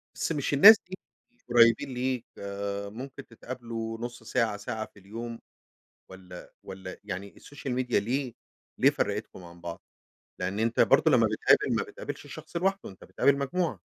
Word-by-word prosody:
بس - - -2
مش 145 -2 -1
الناس 205 +10 +11
دي 190 - -6 0.5
قريبين 115 +1 +5
ليك 125 -1 -2 0.6
ممكن 130 +5 -9
تتقابلوا 115 -2 -6
نص 120 +1 -6
ساعة، 115 -4 0
ساعة 110 +1 -4
في 100 - -19
اليوم، 115 +4 -7 0.7
والّا 90 -1 -12
والّا 95 -1 -8
يعني 95 +2 -6
السوشيال 140 -3 -6
ميديا 125 -4 +1
ليه 125 +3 -2 0.4
ليه - - +6
فرقتكم 90 - -3
عن 85 0 -13
بعض؟ 85 0 -7 0.6
لأن 95 +3 -2
أنت 115 +1 +1
برضه - - +5
لما - - +5
بتقابل - - +3
ما - - +1
بتقابلش - - -7
الشخص - - -10
لوحده 195 - 0
أنت 95 - -15
بتقابل 140 0 +2
مجموعة. 140 - -1
115 Hz, 150 wpm, -28 LUFS, 100-130 Hz, 0.7 s, الناس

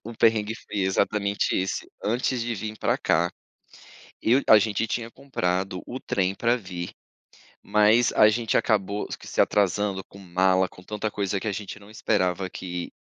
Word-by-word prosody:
O 115 - -7
perrengue 110 -1 +3
foi 105 - -4
exatamente 100 +1 +1
esse, 95 +1 -2
antes 120 +3 0
de 120 -1 -2
vim 110 +1 -5
pra - - 0
cá. 85 +2 +2 0.9
Eu 125 +5 +4
a 110 - +10
gente 110 +1 0
tinha 115 +1 -3
comprado 95 -9 -2
o 130 +2 -5
trem 95 0 0
pra 120 +1 +2
vir, 90 -4 -6 0.7
mas 110 +3 +4
a 105 - +7
gente 115 0 0
acabou 105 -2 +1
que - - -12
se - - +3
atrasando 100 -1 +1
com 100 - -15
mala, 95 0 +2
com 90 - -15
tanta 105 +2 -3
coisa 100 -1 -1
que 110 - -7
a - - -1
gente 100 +1 -6
não 100 +1 -16
esperava 95 -4 0
que 90 -1 -6
105 Hz, 170 wpm, -25 LUFS, 95-110 Hz, 0.9 s, a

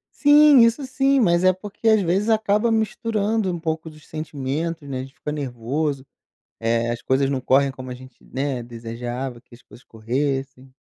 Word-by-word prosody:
Sim, 295 -1 +7
isso 230 +4 +2
sim. 270 +1 +2
Mas 175 -6 +3
é 185 0 +5
porque, 205 +4 -6
às 220 -1 +5
vezes, 190 +5 0
acaba 220 +1 +2
misturando 220 -2 0
um 175 - -4
pouco 160 0 -3
dos 155 -1 -16
sentimentos, 155 +1 -4
né. 135 -2 -4
A - - -2
gente 135 0 -12
fica 150 - -5
nervoso. 140 +1 -3 0.5
Eh, 115 +1 0
as 120 0 -4
coisas 135 +1 +1
não 135 -2 -1
correm 135 +2 +3
como 130 -1 -9
a - - -3
gente, 130 0 -16
né, 135 -1 -3
desejava 120 +2 -6
que 125 - -23
as 120 - -19
coisas 120 - -17
corressem. 135 +3 -3
145 Hz, 180 wpm, -22 LUFS, 130-205 Hz, 0.5 s, Sim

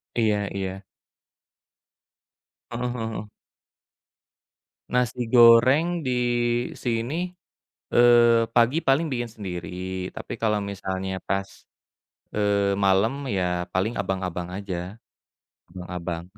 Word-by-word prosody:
Iya 105 -3 +1
iya. 95 0 -4 1.9
Heeh 120 +1 -3
heeh. 110 -2 -4 1.6
Nasi 125 -1 -1
goreng 130 +9 +6
di 130 - 0 0.6
sini, 125 +9 -2 0.6
eee, 120 -1 +5
pagi 120 +6 +4
paling 135 +5 +2
bikin 120 -2 -2
sendiri 95 -1 -5
tapi - - -6
kalau 105 -2 +2
misalnya 95 -1 -4
pas, 95 0 -1 0.9
eee, 100 -1 +1
malem 100 +4 +3 0.2
ya 90 -1 -1
paling 95 +5 0
abang-abang 90 -2 -3
aja, 100 -3 -4 0.9
abang-abang. 90 -2 -5
105 Hz, 90 wpm, -25 LUFS, 95-120 Hz, 1.9 s, goreng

